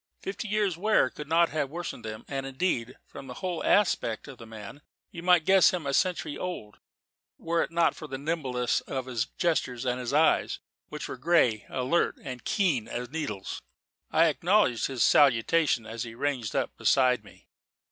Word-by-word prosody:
Fifty 200 Hz, +3 st, -5 dB
years' 205 Hz, -4 st, 0 dB
wear 210 Hz, -9 st, +3 dB
could 150 Hz, -, -8 dB
not 165 Hz, +2 st, +3 dB
have 150 Hz, -3 st, -2 dB
worsened 170 Hz, -5 st, -6 dB
them; 110 Hz, -1 st, -7 dB
and, 135 Hz, -1 st, -4 dB
indeed, 130 Hz, -4 st, -2 dB
from 135 Hz, -, -11 dB
the 125 Hz, -, -8 dB
whole 180 Hz, +1 st, -4 dB
aspect 150 Hz, -, +1 dB
of 135 Hz, -3 st, -11 dB
the 115 Hz, -, -11 dB
man, 110 Hz, +5 st, -10 dB, 0.3 s
you 170 Hz, -, -8 dB
might 180 Hz, -2 st, +4 dB
guess 190 Hz, 0 st, +6 dB
him 175 Hz, -4 st, -4 dB
a 140 Hz, -, -1 dB
century 170 Hz, -2 st, 0 dB
old, 175 Hz, -13 st, -6 dB, 0.6 s
were 165 Hz, 0 st, 0 dB
it -, -, -2 dB
not 170 Hz, 0 st, +2 dB
for 155 Hz, -, -9 dB
the 135 Hz, -, -5 dB
nimbleness 135 Hz, -5 st, -1 dB
of 130 Hz, -2 st, -3 dB
his 125 Hz, -2 st, -2 dB
gestures 130 Hz, -7 st, 0 dB
and 125 Hz, 0 st, -1 dB
his 125 Hz, 0 st, -4 dB
eyes, 155 Hz, +3 st, +3 dB, 0.3 s
which -, -, -6 dB
were -, -, -6 dB
grey, 125 Hz, -7 st, +2 dB
alert, 130 Hz, +7 st, 0 dB
and 125 Hz, -3 st, -7 dB
keen 155 Hz, -, +1 dB
as 125 Hz, +1 st, -5 dB
needles. 140 Hz, -12 st, -4 dB, 0.5 s
I 160 Hz, +1 st, +4 dB
acknowledged 170 Hz, -, +2 dB
his 130 Hz, -4 st, 0 dB
salutation 140 Hz, -1 st, +3 dB
as 115 Hz, +1 st, -6 dB
he 115 Hz, -1 st, -6 dB
ranged 130 Hz, -4 st, -2 dB
up -, -, -1 dB
beside 130 Hz, -2 st, +3 dB
me. -, -, -18 dB
140 Hz, 180 wpm, -28 LUFS, 125-170 Hz, 0.6 s, guess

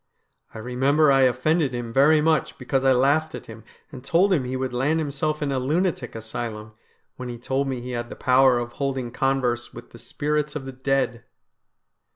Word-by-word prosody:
I -, -, -6 dB
remember 135 Hz, +6 st, +2 dB
I 135 Hz, 0 st, +4 dB
offended 140 Hz, +2 st, 0 dB
him 120 Hz, -1 st, -5 dB
very 150 Hz, +4 st, +5 dB
much 155 Hz, 0 st, +1 dB
because 135 Hz, -1 st, -1 dB
I 135 Hz, -, +4 dB
laughed 145 Hz, +5 st, +2 dB
at -, -, -9 dB
him 110 Hz, -1 st, -11 dB, 0.3 s
and 130 Hz, -4 st, -10 dB
told 180 Hz, +7 st, +3 dB
him 140 Hz, -8 st, +1 dB
he 125 Hz, +1 st, -3 dB
would 130 Hz, -1 st, -3 dB
land 140 Hz, +6 st, +1 dB
himself 150 Hz, 0 st, -2 dB
in 140 Hz, -, -1 dB
a 135 Hz, -, 0 dB
lunatic 150 Hz, -1 st, -1 dB
asylum, 110 Hz, -1 st, -6 dB, 0.4 s
when 125 Hz, -1 st, -6 dB
he 120 Hz, -, -6 dB
told 135 Hz, +3 st, -2 dB
me 130 Hz, -2 st, -3 dB
he 125 Hz, +1 st, -6 dB
had 120 Hz, -1 st, -4 dB
the -, -, -8 dB
power 130 Hz, 0 st, +4 dB
of 120 Hz, 0 st, -4 dB
holding 130 Hz, -2 st, -3 dB
converse 125 Hz, -2 st, -1 dB
with -, -, -11 dB
the -, -, -13 dB
spirits 150 Hz, 0 st, -2 dB
of 140 Hz, -3 st, -5 dB
the 135 Hz, -, -6 dB
dead.' 130 Hz, -2 st, -1 dB
135 Hz, 195 wpm, -24 LUFS, 125-150 Hz, 0.4 s, very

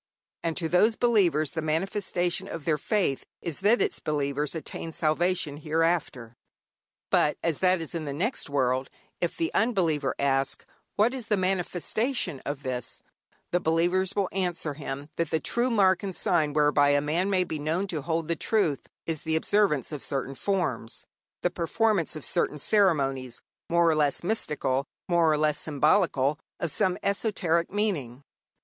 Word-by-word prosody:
And 165 Hz, -1 st, -2 dB
to 165 Hz, -, -1 dB
these 210 Hz, +7 st, +4 dB
believers 180 Hz, -, +2 dB
the 160 Hz, -, -3 dB
manifestation 175 Hz, +2 st, -1 dB
of 165 Hz, -6 st, -7 dB
their 155 Hz, -2 st, +1 dB
faith 190 Hz, -7 st, 0 dB, 0.2 s
is 165 Hz, -4 st, -3 dB
that 210 Hz, +5 st, +4 dB
its -, -, -2 dB
believers 145 Hz, 0 st, -1 dB
attain 165 Hz, +1 st, -6 dB
salvation 160 Hz, -1 st, 0 dB
hereafter. 155 Hz, -6 st, -1 dB, 0.8 s
But 150 Hz, -, +3 dB
as 165 Hz, -4 st, 0 dB
that 185 Hz, -1 st, +3 dB
is 160 Hz, -, -2 dB
in 165 Hz, -2 st, -3 dB
the 145 Hz, -, -3 dB
next 180 Hz, -, -2 dB
world, 130 Hz, -1 st, 0 dB, 0.3 s
if 175 Hz, -, -2 dB
the 330 Hz, -1 st, -1 dB
unbeliever 165 Hz, -, +1 dB
ask 135 Hz, -1 st, 0 dB, 0.3 s
what 225 Hz, +5 st, +3 dB
is 250 Hz, -4 st, -5 dB
the 210 Hz, -, +2 dB
manifestation 185 Hz, -, -1 dB
in 145 Hz, -, -1 dB
this, 125 Hz, -2 st, -5 dB, 0.5 s
the 175 Hz, -, +2 dB
believers 175 Hz, +4 st, +1 dB
will 200 Hz, -2 st, +1 dB
answer 175 Hz, -5 st, -2 dB
him 140 Hz, -1 st, -6 dB
that 170 Hz, -2 st, 0 dB
the 160 Hz, -, +1 dB
true 240 Hz, +9 st, 0 dB
mark 190 Hz, -5 st, +3 dB
and 195 Hz, -3 st, -5 dB
sign 165 Hz, -7 st, +1 dB
whereby 145 Hz, -1 st, +4 dB
a 145 Hz, 0 st, +4 dB
man 160 Hz, +7 st, 0 dB
may 185 Hz, -2 st, +2 dB
be 160 Hz, -3 st, -4 dB
known 160 Hz, +6 st, -1 dB
to 160 Hz, -4 st, -2 dB
hold 160 Hz, +1 st, -2 dB
the 170 Hz, -, 0 dB
truth 165 Hz, -8 st, 0 dB, 0.2 s
is 160 Hz, -2 st, -3 dB
the 160 Hz, -1 st, -1 dB
observance 160 Hz, -, +1 dB
of 150 Hz, -3 st, -5 dB
certain 135 Hz, -1 st, -2 dB
forms, 135 Hz, -, -2 dB, 0.4 s
the -, -, +2 dB
performance 190 Hz, 0 st, 0 dB
of 155 Hz, -, -6 dB
certain 150 Hz, -, 0 dB
ceremonies, 135 Hz, -, +1 dB, 0.3 s
more 170 Hz, 0 st, +4 dB
or 160 Hz, -, +4 dB
less 150 Hz, -1 st, +1 dB
mystical, 150 Hz, -9 st, -1 dB, 0.2 s
more 170 Hz, -3 st, +3 dB
or 155 Hz, -, +2 dB
less 150 Hz, 0 st, +2 dB
symbolical, 150 Hz, -1 st, +2 dB, 0.2 s
of 170 Hz, -, -1 dB
some 185 Hz, +4 st, +1 dB
esoteric 190 Hz, -5 st, 0 dB
meaning. 155 Hz, -, -2 dB
165 Hz, 165 wpm, -27 LUFS, 145-190 Hz, 0.8 s, these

